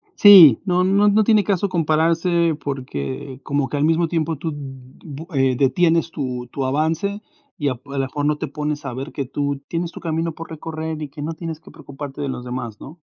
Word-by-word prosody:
Sí, 185 - +9
no 180 -1 +2
no 200 +2 +3
no 215 +1 +4
tiene 215 -1 +4
caso 200 0 0
compararse 165 0 +2
porque 130 - -5
como 140 -1 -1
que 145 - -3
al 145 - +1
mismo 165 +1 +2
tiempo 160 -2 -1
tú 160 +2 -4
d 145 - -7 0.5
bu 155 +1 -8
eh, 135 -2 +2
detienes 165 +4 +2
tu 125 -4 -4
tu 135 - -3
avance 160 +9 -1 0.4
y 145 - -1
ap 130 +2 -7
a 140 - -9
lo 135 - +1
mejor 145 +2 -3
no 150 0 +1
te - - -4
pones 150 -1 -4
a 130 - -4
ver 135 +5 -6
que 140 - -4
tú 140 +1 -3
tienes 170 0 -3
tu - - -10
camino 165 0 -2
por 165 +1 -9
recorrer 160 0 -5
y 150 - -5
que 145 +2 -10
no 155 +3 -3
tienes 165 -1 -6
que - - -16
preocuparte 145 -2 -9
de 140 - -2
los 125 - -5
demás, 125 -4 -5
¿no? 160 +5 -11
155 Hz, 220 wpm, -21 LUFS, 135-165 Hz, 0.5 s, Sí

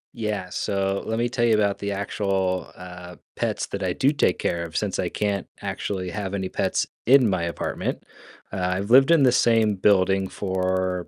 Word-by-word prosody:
Yeah, 105 -5 -3
so 95 +1 -1
let 110 0 -1
me 120 - +1
tell 120 0 -2
you 115 -2 +4
about 100 -2 +1
the 100 0 -3
actual, 95 -2 -1
uh, 90 -1 -10 0.2
pets - - -1
that 100 - -5
I 90 -1 0
do 135 +8 +2
take 145 -11 +1
care 85 -1 -1
of 85 -1 -5
since - - -2
I - - 0
can't 100 -2 -2
actually 90 -3 -4
have 100 0 -4
any 95 -1 -3
pets - - 0 0.2
in 130 -1 +6
my 95 -4 0
apartment. 85 -1 -3 0.5
Uh, - - -5 0.2
I've 100 +3 -4
lived 135 +3 +7
in 165 -4 +5
the 125 - +5
same 115 -3 +3
building 95 0 +3
for 95 -2 -1
100 Hz, 190 wpm, -24 LUFS, 95-110 Hz, 0.5 s, lived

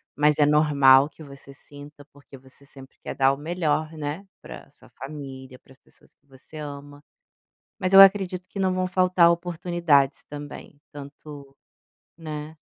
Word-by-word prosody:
mas 150 +1 +1
é 145 - +5
normal 145 -2 +4
que 155 - -19
você 140 -1 -14
sinta 145 +1 -15
porque 140 -1 -16
você 130 +2 -17
sempre 135 -1 -16
quer - - -6
dar 135 0 +2
o 140 - -7
melhor, 155 -1 -2
né, 155 +4 -6 0.2
pra - - -12
sua - - -17
família, 135 -3 -10
para 135 - -21
as - - -26
pessoas - - -21
que - - -46
você 135 +2 -18
ama. 145 -1 -10 0.8
Mas 185 +1 -2
eu 195 - +9
acredito 185 -2 +3
que 200 - -8
não 190 -1 +1
vão 185 0 -1
faltar 180 -2 +3
oportunidades 170 -5 0
também, 145 0 -11
tanto 140 -1 -12 0.6
né. 155 -1 -8
145 Hz, 160 wpm, -23 LUFS, 140-170 Hz, 0.8 s, eu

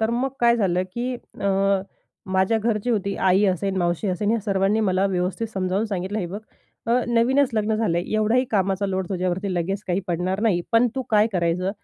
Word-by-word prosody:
तर 220 +1 +1
मग 250 +3 0
काय 235 0 +5
झालं, 185 -4 +1
की 250 +1 -2 0.3
अ, 195 0 +2 0.5
माझ्या 190 +4 +2
घरची 220 +1 -1
होती, 200 -3 0
आई 190 +2 +3
असेन, 190 +1 0
मावशी 175 +2 0
असेन, 205 +4 0
या 230 -1 +1
सर्वांनी 200 +1 +1
मला 190 -1 +2
व्यवस्थित 185 +4 -1
समजावून 190 +2 -1
सांगितलं, 195 +1 -3
हे 180 - -2
बघ, 200 +5 -6 0.5
अ, 240 +2 +3
नवीनच 250 +4 +3
लग्न 215 0 +1
झालंय, 175 -6 0
एवढाही 225 +4 +2
कामाचा 195 -1 +1
लोड 190 -2 -2
तुझ्यावरती 185 +1 -2
लगेच 195 +4 -2
काही 180 +1 0
पडणार 180 +3 -1
नाही, 190 -6 +2
पण 235 +2 +5
तू 265 - -2
काय 210 0 +5
करायचं, 180 +1 0
195 Hz, 190 wpm, -23 LUFS, 185-220 Hz, 0.5 s, काय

